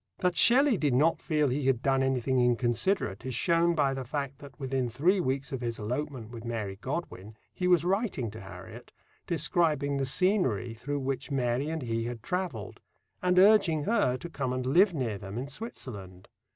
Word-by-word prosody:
That 180 -1 0
Shelley 255 - +6
did 145 -5 +1
not 155 +6 +2
feel 150 -3 +1
he 135 +1 -1
had 130 -1 +1
done 135 -1 +2
anything 130 -1 +1
inconsiderate 120 - 0
is 130 -1 -4
shown 170 +4 +2
by 140 -3 +2
the 135 -1 -4
fact 140 +1 -4
that, 140 0 -13
within 130 -2 -1
three 165 - +2
weeks 135 -3 -2
of 130 -2 -4
his 115 -1 -3
elopement 125 +1 -4
with 115 -2 -8
Mary 110 -5 -4
Godwin, 110 - -6 0.2
he 180 - -2
was 175 -2 +4
writing 185 - -1
to 110 +1 -10
Harriet, 95 -1 -11 0.3
describing 150 -3 +1
the 135 -1 -1
scenery 135 - +1
through 140 +5 -4
which 135 0 -3
Mary 130 +1 0
and 160 -3 -3
he 115 -1 -2
had 120 -2 -6
travelled, 175 - -4 0.4
and 180 0 +1
urging 190 -6 +5
her 200 - +1
to 170 - -8
come 135 -6 -3
and 130 0 -3
live 180 +10 +4
near 115 -8 -2
them 100 +2 -7
in 130 +3 -4
Switzerland. 105 - -8
135 Hz, 185 wpm, -29 LUFS, 120-165 Hz, 0.4 s, Shelley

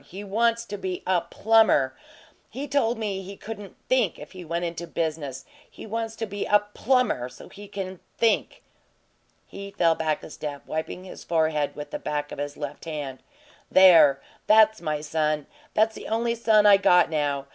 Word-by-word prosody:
He 190 +7 -9
wants 230 +3 +1
to 205 -2 -6
be 185 -1 -4
a 185 -2 +2
PLUMBER! 220 -14 +3 0.5
He 280 +3 -6
told 255 -4 +1
me 205 -3 -3
he 195 +1 -9
couldn't 210 -3 -9
THINK 255 0 +2
if - - -11
he 185 -2 -9
went 170 +1 -3
into 170 0 -5
business 150 -5 -3 0.2
he - - -11
wants 225 +1 -4
to 225 - -3
be 205 -1 -4
a 210 - +6 0.2
plumber 250 - +1
so 125 - -13
he 205 0 -12
can 190 -2 -6 0.2
THINK!" 230 -2 +1 0.8
He 200 0 -9
fell 170 -4 +2
back 160 -1 -2
a - - -10
step, 145 -2 -7
wiping 160 +3 -4
his 185 - -10
forhead 155 -3 0
with 150 - -8
the - - -4
back 145 0 -3
of - - -7
his 145 0 -5
left 145 +1 -7
hand. 145 -5 -5 0.5
"There! 165 -7 +7 0.3
That's 220 -1 +5
my 155 -2 -2
son! 155 -1 -1 0.3
That's 220 +1 +3
the - - -9
only 230 +1 0
son 220 -2 +3
I 205 -1 +8
got 180 -3 +4
now! 145 -3 -1
185 Hz, 180 wpm, -25 LUFS, 155-220 Hz, 0.8 s, I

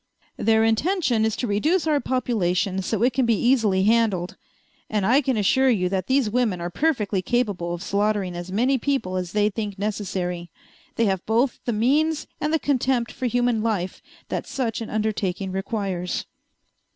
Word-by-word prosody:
"Their 220 0 +3
intention 235 - +2
is 220 -1 0
to - - -2
reduce 300 - +1
our 300 -2 +2
population 200 -8 0
so 220 +3 -1
it 250 0 +3
can 255 -1 +1
be 230 -2 +3
easily 220 -7 +3
handled. 210 -5 +2 0.5
And 210 -3 0
I 255 +7 +4
can 260 -4 0
assure 260 +6 +3
you 185 -7 +2
that 185 -1 -2
these 265 -2 +2
women 220 -4 0
are 175 +1 -4
perfectly 215 - 0
capable 190 -6 -1
of 175 - -8
slaughtering 200 -3 0
as 175 +1 -6
many 250 +7 +2
people 265 -9 -1
as 180 -2 -3
they 210 0 +2
think 205 -1 -4
necessary. 185 -4 -3 0.5
They 230 - +2
have 190 -3 0
both 235 +4 +1
the 240 - 0
means 295 +8 +1
and 300 0 -1
the 320 - +3
contempt 260 -5 0
for 255 - -3
human 245 -1 +1
life 200 -5 -2 0.3
that - - -3
such 235 -4 -2
an 225 - -5
undertaking 205 -3 -2
requires." 190 -2 -3
220 Hz, 175 wpm, -24 LUFS, 190-250 Hz, 0.5 s, I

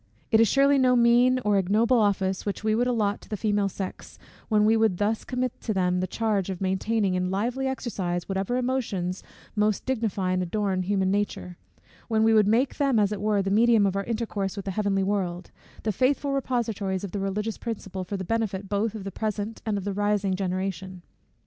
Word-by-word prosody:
It 220 - +5
is 225 - +6
surely 275 +4 +4
no 255 -1 +4
mean 240 +2 +5
or 205 -1 +3
ignoble 220 +6 +3
office 195 -2 +1
which 205 0 -4
we 215 0 +2
would 240 +3 +1
allot 215 -4 0
to - - -16
the 210 - -3
female 205 -1 +1
sex, 190 0 -7 0.3
when 210 -2 +3
we 220 +1 +4
would 220 -5 +2
thus 210 +3 0
commit 250 -1 -3
to 215 - -2
them 180 -1 +1
the 185 - -1
charge 210 -4 -1
of 185 -2 -4
maintaining 195 +1 0
in 180 0 0
lively 240 +8 -1
exercise 190 -10 -3
whatever 195 +5 -1
emotions 215 -8 -2 0.3
most 210 -1 +1
dignify 220 -7 -1
and 185 0 +1
adorn 190 +1 -1
human 190 0 0
nature; 190 - -2 0.5
when 220 -1 +2
we 225 0 +4
would 215 -2 +5
make 240 +5 +2
them 275 -5 +2
as 205 -1 +3
it 205 -2 -4
were 210 -1 +1
the 195 - -2
medium 225 0 +4
of 195 -1 0
our 200 0 -1
intercourse 215 -4 -2
with 200 - -6
the 195 - -2
heavenly 195 -1 0
world, 190 -3 -2 0.3
the 220 - 0
faithful 275 +6 +1
repositories 225 -8 -1
of 200 - -5
the 205 - -3
religious 210 +3 -2
principle, 195 -5 -5
for 200 +2 -4
the 190 - -4
benefit 205 -2 -2
both 205 +2 -1
of 210 - -6
the 195 - -5
present 215 +1 -3
and 210 -2 0
of 195 - -4
the 200 0 -2
rising 205 -1 0
generation. 185 -1 -3
205 Hz, 205 wpm, -26 LUFS, 190-225 Hz, 0.5 s, is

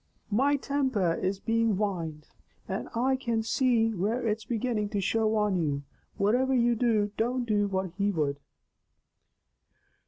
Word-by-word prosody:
"My 275 +7 +3
timper 260 -11 0
is 190 +1 -1
being 225 -2 +1
wined, 165 -7 -3 0.4
and - - -4
I 260 +3 +2
can 235 -4 -1
see 230 -2 +2
where 220 +6 -1
it's 215 0 -1
beginning 225 -3 -1
to 205 -2 -1
show 220 +3 +1
on 210 -3 +2
you. 145 -4 -1 0.4
Whativer 250 +6 +2
you 240 0 +3
do, 220 -3 +1
don't 245 +2 0
do 205 -2 +1
what 190 -2 -2
he 200 +1 +2
would." 150 -6 -1
220 Hz, 145 wpm, -28 LUFS, 195-240 Hz, 0.4 s, My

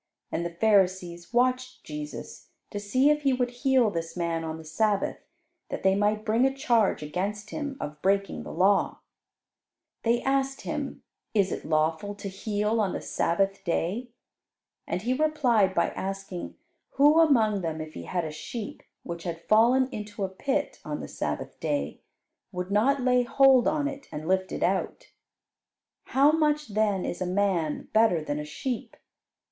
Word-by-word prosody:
And 170 - -1
the 170 - -2
Pharisees 185 -4 +2
watched 255 +1 +1
Jesus, 150 -1 -7 0.2
to 205 - -3
see 255 +8 +3
if 300 0 +1
He 275 -2 +2
would 250 -1 0
heal 250 -3 +2
this 165 0 -4
man 165 -1 -1
on 160 0 -4
the 160 - -11
Sabbath, 200 +6 0 0.5
that - - -5
they 190 0 +5
might 210 +2 +1
bring 225 +2 +2
a 270 - +4
charge 235 - +2
against 200 +7 -3
Him 285 -3 -4
of 150 0 -6
breaking 195 +1 +1
the - - -8
law. 195 +2 +2 1.0
They 235 +1 +1
asked 270 0 0
Him, - - -4 0.3
"Is 195 -3 +3
it - - -4
lawful 160 +6 0
to 200 - -7
heal 210 +3 -1
on 195 -3 0
the - - -3
Sabbath 195 +3 0
day?" 190 +9 -1 0.8
and 175 +2 -2
He 245 +3 +1
replied 255 -10 +2
by - - +2
asking 195 -2 -5 0.4
who 295 +4 +5
among 225 -11 +4
them, 160 -2 -3
if 155 0 -7
he - - -8
had 175 -3 -2
a 155 - -4
sheep 210 +8 -6 0.2
which 170 -1 -6
had 165 -1 -5
fallen 240 +4 +5
into 210 -3 -5
a 190 - -1
pit 265 +9 -2
on - - -4
the - - -6
Sabbath - - -4
day, 290 -1 -2 0.5
would 180 0 -4
not 260 +7 +3
lay 250 -1 +4
hold 260 0 +5
on 295 -2 +1
it, 280 -1 -7
and 155 +1 -6
lift 190 0 +1
it - - -2
out. - - -1 0.9
"How 280 +3 +4
much 300 -3 +1
then 205 -3 +1
is 175 - -4
a 185 - 0
man 180 -5 0
better 215 -7 +4
than 145 -1 -3
a 150 - -4
sheep? 235 - -5
205 Hz, 170 wpm, -27 LUFS, 180-255 Hz, 1.0 s, they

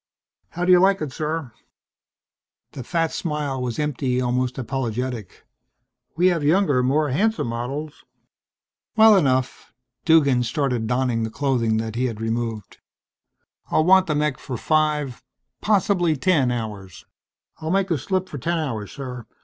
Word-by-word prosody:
"How 175 +1 -3
do 185 - +4
you 180 - +7
like 195 +1 +4
it, 150 -3 -4
sir?" 155 -4 -3 1.2
The 130 - -7
fat 165 +4 -1
smile 150 -5 -3
was 125 -2 -3
empty, 135 -4 -1
almost 125 0 -1
apologetic. 125 -4 -4 0.7
"We 175 - +3
have 170 -4 -1
younger, 150 -4 +3
more 145 +4 +1
handsome 220 - +1
models...." 140 +6 -5 0.9
"Well 220 -1 +7
enough." 130 -8 0 0.3
Duggan 140 -6 +4
started 120 -1 -1
donning 125 -1 0
the 110 - -2
clothing 120 -4 0
that 110 0 -3
he 125 +3 -1
had 115 -4 -3
removed. 115 -1 -4 0.9
"I'll 155 - +2
want 190 +1 +5
the 150 - 0
mech 150 -3 0
for 125 - -6
five, 150 -4 0 0.4
possibly 195 -5 +2
ten, 145 -3 +2
hours." 105 -7 -6 0.5
"I'll 160 0 -4
make 195 +2 +2
out - - -21
the 165 - +1
slip 185 +6 -2
for 145 - -7
ten 170 +5 -1
hours, 115 -10 -4
sir. 125 -4 -7
140 Hz, 150 wpm, -22 LUFS, 125-165 Hz, 1.2 s, you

